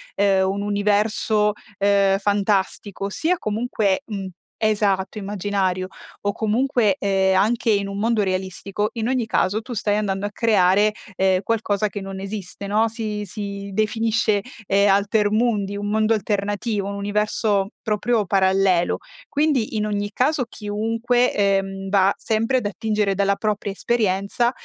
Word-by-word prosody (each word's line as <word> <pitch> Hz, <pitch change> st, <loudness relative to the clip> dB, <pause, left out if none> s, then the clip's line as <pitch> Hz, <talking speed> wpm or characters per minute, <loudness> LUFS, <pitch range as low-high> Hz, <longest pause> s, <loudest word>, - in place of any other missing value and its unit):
ehm, 195 Hz, -1 st, +3 dB
un 195 Hz, +1 st, -2 dB
universo, 210 Hz, +1 st, +1 dB, 0.2 s
ehm, 200 Hz, -1 st, +3 dB
fantastico, 200 Hz, -1 st, 0 dB
sia 335 Hz, -, 0 dB
comunque 215 Hz, -2 st, 0 dB
un 200 Hz, -4 st, -5 dB, 0.3 s
esatto, 205 Hz, -2 st, +1 dB
immaginario 195 Hz, -2 st, -1 dB, 0.4 s
o 205 Hz, 0 st, 0 dB
comunque, 225 Hz, -2 st, +1 dB
ehm, 190 Hz, -1 st, +2 dB
anche 225 Hz, +3 st, +1 dB
in 200 Hz, -1 st, +1 dB
un 200 Hz, -, -5 dB
mondo 220 Hz, 0 st, +1 dB
realistico, 190 Hz, +2 st, -2 dB
in 225 Hz, -1 st, -2 dB
ogni 255 Hz, -2 st, 0 dB
caso 215 Hz, -1 st, 0 dB
tu 235 Hz, -, -11 dB
stai 210 Hz, -2 st, 0 dB
andando 200 Hz, -1 st, -1 dB
a 205 Hz, -, -3 dB
creare, 205 Hz, -2 st, +3 dB, 0.2 s
ehm, 190 Hz, 0 st, +2 dB
qualcosa 215 Hz, -1 st, 0 dB
che 205 Hz, 0 st, -6 dB
non 195 Hz, 0 st, -6 dB
esiste, 195 Hz, -1 st, -6 dB
no. 215 Hz, +3 st, +2 dB
Si 215 Hz, -2 st, -4 dB
si 200 Hz, 0 st, -6 dB
definisce, 215 Hz, 0 st, +1 dB, 0.3 s
ehm, 200 Hz, +1 st, +3 dB
alter 205 Hz, +1 st, +2 dB
mundi, 210 Hz, -3 st, 0 dB
un 205 Hz, -, -4 dB
mondo 220 Hz, +1 st, +2 dB
alternativo, 205 Hz, 0 st, -1 dB
un 200 Hz, -, -4 dB
universo 205 Hz, 0 st, 0 dB
proprio 215 Hz, 0 st, 0 dB
parallelo. 190 Hz, -2 st, +2 dB, 0.3 s
Quindi, 280 Hz, -7 st, +1 dB
in 210 Hz, -, 0 dB
ogni 205 Hz, -1 st, -2 dB
caso 265 Hz, +5 st, +1 dB
chiunque, 225 Hz, +4 st, 0 dB
ehm, 195 Hz, -1 st, 0 dB
va 195 Hz, 0 st, +4 dB
sempre 225 Hz, +3 st, 0 dB
ad 245 Hz, -, -2 dB
attingere 210 Hz, -1 st, 0 dB
dalla 200 Hz, 0 st, +1 dB
propria 210 Hz, -1 st, -2 dB
esperienza, 205 Hz, +2 st, 0 dB
205 Hz, 140 wpm, -22 LUFS, 195-220 Hz, 0.4 s, va